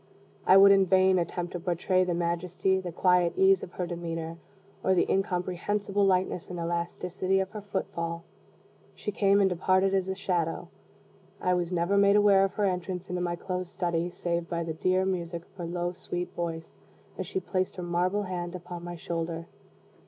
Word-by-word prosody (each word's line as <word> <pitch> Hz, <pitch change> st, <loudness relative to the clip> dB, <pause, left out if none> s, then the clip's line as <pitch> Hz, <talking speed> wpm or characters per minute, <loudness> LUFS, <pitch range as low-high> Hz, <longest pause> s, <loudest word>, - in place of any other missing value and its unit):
I 190 Hz, -, +8 dB
would 200 Hz, 0 st, +9 dB
in 195 Hz, -1 st, +5 dB
vain 185 Hz, 0 st, +4 dB
attempt 175 Hz, +1 st, -3 dB
to 175 Hz, -, -3 dB
portray 180 Hz, +2 st, +1 dB
the 180 Hz, -2 st, -1 dB
majesty, 175 Hz, +2 st, 0 dB
the 180 Hz, -2 st, -5 dB
quiet 180 Hz, 0 st, +3 dB
ease 190 Hz, 0 st, +5 dB
of 180 Hz, -, -8 dB
her 180 Hz, -, -2 dB
demeanor, 165 Hz, -1 st, -5 dB, 0.5 s
or 190 Hz, -, +3 dB
the 175 Hz, -, +2 dB
incomprehensible 195 Hz, +2 st, 0 dB
lightness 185 Hz, -2 st, +1 dB
and 180 Hz, -, -5 dB
elasticity 180 Hz, +3 st, -1 dB
of 190 Hz, 0 st, -2 dB
her 215 Hz, -1 st, -6 dB
footfall. 170 Hz, -4 st, -4 dB, 0.7 s
She 210 Hz, -, -4 dB
came 200 Hz, 0 st, +3 dB
and 195 Hz, -, +5 dB
departed 185 Hz, +2 st, +2 dB
as 190 Hz, -1 st, +1 dB
a 190 Hz, -, -1 dB
shadow. 175 Hz, -4 st, -2 dB, 0.7 s
I 180 Hz, -, +1 dB
was 175 Hz, -1 st, -1 dB
never 180 Hz, +3 st, +1 dB
made 200 Hz, 0 st, +5 dB
aware 205 Hz, -2 st, +6 dB
of 195 Hz, -, -1 dB
her 205 Hz, -, +1 dB
entrance 180 Hz, -1 st, -2 dB
into 180 Hz, 0 st, -2 dB
my 175 Hz, -1 st, -1 dB
closed 180 Hz, 0 st, -4 dB
study, 170 Hz, -1 st, -1 dB
save 170 Hz, -1 st, -3 dB
by 170 Hz, -1 st, -1 dB
the 165 Hz, -1 st, -3 dB
dear 185 Hz, +4 st, +1 dB
music 170 Hz, -2 st, -3 dB
of -, -, -30 dB
her 175 Hz, -, -4 dB
low 175 Hz, +1 st, -2 dB
sweet 175 Hz, 0 st, -5 dB
voice, 165 Hz, -2 st, -5 dB, 0.4 s
as 185 Hz, -, -3 dB
she 190 Hz, -, -2 dB
placed 185 Hz, 0 st, -2 dB
her 180 Hz, -, -5 dB
marble 180 Hz, +4 st, 0 dB
hand 180 Hz, -2 st, -4 dB
upon 175 Hz, -1 st, -7 dB
my 175 Hz, 0 st, -6 dB
shoulder. 165 Hz, 0 st, -4 dB
180 Hz, 185 wpm, -28 LUFS, 170-190 Hz, 0.7 s, would